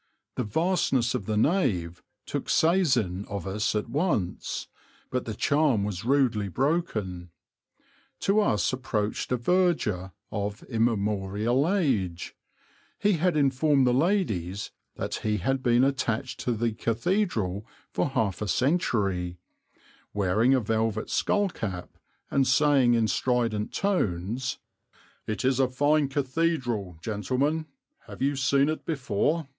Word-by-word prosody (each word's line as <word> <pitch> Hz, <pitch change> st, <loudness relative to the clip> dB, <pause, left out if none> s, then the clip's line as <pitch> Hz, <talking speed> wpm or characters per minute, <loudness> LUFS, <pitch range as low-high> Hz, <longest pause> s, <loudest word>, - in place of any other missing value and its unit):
The -, -, -1 dB
vastness 130 Hz, -, +1 dB
of 95 Hz, -, -3 dB
the 110 Hz, -1 st, 0 dB
nave 105 Hz, -, +1 dB, 0.2 s
took -, -, -4 dB
seisin 130 Hz, -, +2 dB
of 100 Hz, -2 st, -5 dB
us 105 Hz, +3 st, -1 dB
at 105 Hz, -, -1 dB
once; 140 Hz, -, -1 dB, 0.4 s
but 125 Hz, -1 st, -1 dB
the 110 Hz, -, -4 dB
charm 140 Hz, -5 st, +2 dB
was 100 Hz, -2 st, -3 dB
rudely 120 Hz, -5 st, +2 dB
broken. 105 Hz, -, -1 dB, 0.9 s
To 200 Hz, +2 st, +3 dB
us 130 Hz, -, +1 dB
approached 110 Hz, -5 st, -2 dB
a 125 Hz, -, +2 dB
verger 120 Hz, -, +1 dB, 0.2 s
of 100 Hz, 0 st, -3 dB
immemorial 110 Hz, -, 0 dB
age 110 Hz, -, -1 dB, 0.6 s
he 205 Hz, 0 st, +2 dB
had 175 Hz, -1 st, +1 dB
informed 140 Hz, 0 st, +3 dB
the 125 Hz, -, +3 dB
ladies 125 Hz, -, 0 dB, 0.2 s
that -, -, -4 dB
he 105 Hz, -1 st, -1 dB
had 135 Hz, +8 st, 0 dB
been 120 Hz, 0 st, +3 dB
attached 130 Hz, -2 st, -1 dB
to 125 Hz, -, -1 dB
the 115 Hz, +1 st, 0 dB
cathedral 115 Hz, -, -1 dB, 0.2 s
for -, -, 0 dB
half 110 Hz, -9 st, -1 dB
a 105 Hz, -, -2 dB
century 100 Hz, -, 0 dB, 0.8 s
wearing 105 Hz, +6 st, +3 dB
a -, -, +3 dB
velvet 110 Hz, 0 st, -1 dB
skull 205 Hz, -1 st, +2 dB
cap 95 Hz, -, -6 dB, 0.4 s
and 135 Hz, -1 st, +2 dB
saying 135 Hz, -3 st, +4 dB
in 115 Hz, -1 st, +2 dB
strident 115 Hz, -4 st, 0 dB
tones, 125 Hz, -, -1 dB, 0.7 s
"It 110 Hz, +4 st, -2 dB
is 130 Hz, 0 st, +2 dB
a 135 Hz, -, +4 dB
fine 145 Hz, +3 st, +2 dB
cathedral, 130 Hz, -, -1 dB
gentlemen; 130 Hz, -, -1 dB, 0.4 s
have -, -, -6 dB
you 140 Hz, +1 st, +1 dB
seen 135 Hz, +1 st, +3 dB
it 155 Hz, +1 st, -2 dB
before?" 150 Hz, +2 st, -1 dB
120 Hz, 130 wpm, -27 LUFS, 105-145 Hz, 0.9 s, saying